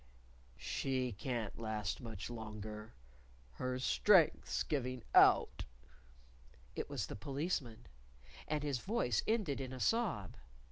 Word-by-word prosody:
"She 130 -2 -1
can't 115 0 -3
last 110 -4 -2
much 110 -2 -6
longer! 110 -1 -7 0.6
Her 125 - -3
strength's 170 +6 +4
giving 130 -5 -2
out." - - +6 1.1
It - - -3
was 135 -8 -2
the - - -7
Policeman. 135 - -3 0.6
And 150 -1 -1
his 140 -4 -1
voice 125 - +1
ended 205 -12 +1
in 130 -1 -5
a 130 - -6
sob. 190 - 0
125 Hz, 110 wpm, -36 LUFS, 110-145 Hz, 1.1 s, out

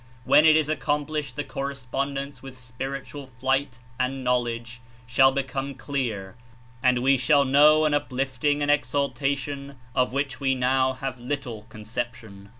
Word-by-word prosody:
When 155 - +6
it 155 - +7
is 155 -2 +1
accomplished 150 -2 -2
the 145 - -2
correspondence 140 +1 -4
with 135 -1 -10
spiritual 135 +2 -6
flight 130 -1 -1 0.2
and 130 +1 -1
knowledge 120 -1 -1 0.2
shall 135 +2 +5
become 135 0 -3
clear 115 -9 -3 0.5
and 125 -1 +3
we 135 +1 +4
shall 140 +2 +4
know 150 +3 +6
an 150 - +2
uplifting 140 +1 0
and 145 - +3
exaltation 140 +1 -1 0.2
of 125 -1 +1
which 135 -1 -2
w^e 135 -2 +1
now 130 +1 +2
have 130 -1 -5
little 120 -4 -5
conception. 110 -2 -6
135 Hz, 140 wpm, -25 LUFS, 125-140 Hz, 0.5 s, it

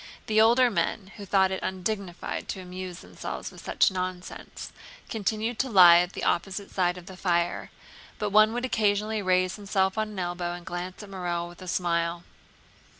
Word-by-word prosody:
The 220 -1 +3
older 240 +2 +5
men, 190 +2 -1
who 200 -2 -8
thought 190 0 +3
it 190 - -3
undignified 190 -1 -4
to - - -4
amuse 180 -1 -7
themselves - - -7
with - - -13
such - - +3
nonsense, 185 -1 -6 0.4
continued 220 +2 -2
to 265 - 0
lie 180 -5 +9
at 180 +1 -1
the - - -6
opposite 195 +3 -1
side 180 -1 +1
of 180 - -10
the 190 - -10
fire, 175 -2 0 0.5
but 210 -1 -2
one 215 +1 +6
would 245 +1 -2
occasionally 215 -2 +1
raise 185 0 +1
himself 195 0 0
on 215 0 -1
an 210 - -9
elbow 175 -1 -2
and 175 0 -9
glance 180 +3 -6
at 205 - -11
Morel 175 -2 -3
with 175 +1 -14
a 185 - -9
smile. 170 -1 -1
185 Hz, 180 wpm, -27 LUFS, 175-210 Hz, 0.5 s, lie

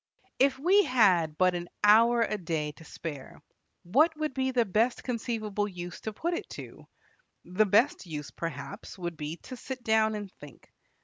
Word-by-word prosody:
If 270 0 +4
we 375 +8 +4
had 180 - +3
but 185 0 +4
an 175 0 -5
hour 230 +3 +6
a 215 - -1
day 160 -6 -2
to 150 - -16
spare, 150 -4 -8 0.4
what 305 - +3
would 305 -2 -2
be 265 0 0
the 250 -3 +2
best 225 +5 +1
conceivable 220 -4 -2
use 175 -2 -8
to 220 - -4
put 335 +11 -2
it 340 - -4
to? - - -10 0.6
The 210 +4 +2
best 215 +1 +2
use, 150 -3 -6
perhaps, 140 -2 -7
would 175 -2 -4
be 155 +2 -5
to 255 - -8
sit 255 0 -7
down 220 -1 +2
and 205 -2 -6
think. 145 -1 -14
210 Hz, 175 wpm, -29 LUFS, 170-245 Hz, 0.6 s, hour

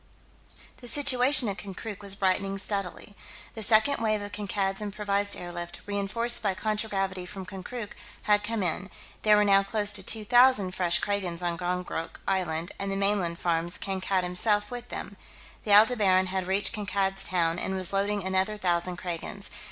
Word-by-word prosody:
The 245 - -11
situation 260 -1 +4
at 200 -1 -3
Konkrook 205 +1 -7
was 200 -1 +1
brightening 195 0 0
steadily. 200 0 -4 0.4
The 220 - -7
second 220 +5 +4
wave 215 -1 +1
of 205 - -7
Kankad's 200 -1 -2
improvised 205 -1 -1
airlift, 175 -1 -6
reenforced 205 +4 0
by 195 -3 0
contragravity 205 -3 -1
from 195 -2 -7
Konkrook, 205 +4 -7 0.3
had 205 0 +3
come 215 -1 -2
in; 180 +3 -2 0.3
there 210 -1 +5
were 210 - +4
now 195 -1 +5
close 205 +1 +1
to 205 - 0
two 215 +3 -2
thousand 245 -4 +5
fresh 175 -2 +1
Kragans 185 -4 -2
on 175 -1 0
Gongonk 180 -1 -4
Island 175 -2 -1
and 195 0 -2
the - - -1
mainland 195 -4 +1
farms, 170 0 +1
Kankad 190 -1 -1
himself 205 +4 +1
with 245 -1 -7
them. - - -7 0.5
The 210 - -1
Aldebaran 205 -4 +5
had 190 -1 -2
reached 195 +3 0
Kankad's 200 -2 -1
Town, 170 -2 +1
and 190 - -2
was 185 0 0
loading 200 0 0
another 190 +3 0
thousand 175 -2 0
Kragans.... 180 +3 -5
195 Hz, 165 wpm, -27 LUFS, 185-210 Hz, 0.5 s, there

